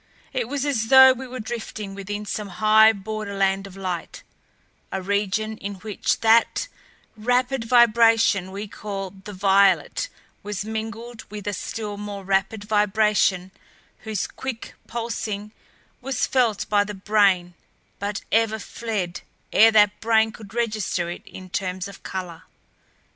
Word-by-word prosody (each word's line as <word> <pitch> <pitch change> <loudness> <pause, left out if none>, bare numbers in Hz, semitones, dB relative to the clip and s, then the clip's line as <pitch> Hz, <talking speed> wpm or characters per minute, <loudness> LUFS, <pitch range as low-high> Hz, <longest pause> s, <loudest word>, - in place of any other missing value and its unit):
It - - -1
was 285 -1 -2
as 235 -6 0
though 265 +1 +9
we 260 +1 -8
were 255 +1 -7
drifting 215 -3 -6
within 205 +1 -5
some 210 0 -4
high 215 +2 +6
borderland 200 -2 -2
of 195 0 -13
light; 185 -3 -5 0.7
a 190 - -2
region 205 +3 -1
in 200 0 -6
which 210 +2 -2
that 230 - +4 0.5
rapid 250 +2 0
vibration 230 -4 +4
we 200 +2 -5
call 195 -2 -6
the 195 +1 -11
violet 200 - +3 0.3
was 205 -1 -4
mingled 225 +1 -6
with 210 -1 -8
a 205 - -1
still 210 +1 -5
more 205 -1 -6
rapid 195 +2 0
vibration 210 -3 +2 0.5
whose 220 -2 -3
quick 260 -4 -6
pulsing 220 -3 -4 0.5
was 260 0 -1
felt 235 -6 +1
by 205 -1 +3
the 205 0 -7
brain 195 -3 +2 0.5
but 205 +1 -3
ever 225 -1 +2
fled 205 -5 -4 0.3
ere 225 +2 +8
that 210 -1 +4
brain 220 0 +3
could 215 0 -13
register 215 -7 -1
it - - -7
in 185 - -10
terms 185 0 -3
of 200 - -12
color. 180 -3 -6
210 Hz, 135 wpm, -23 LUFS, 195-225 Hz, 0.7 s, though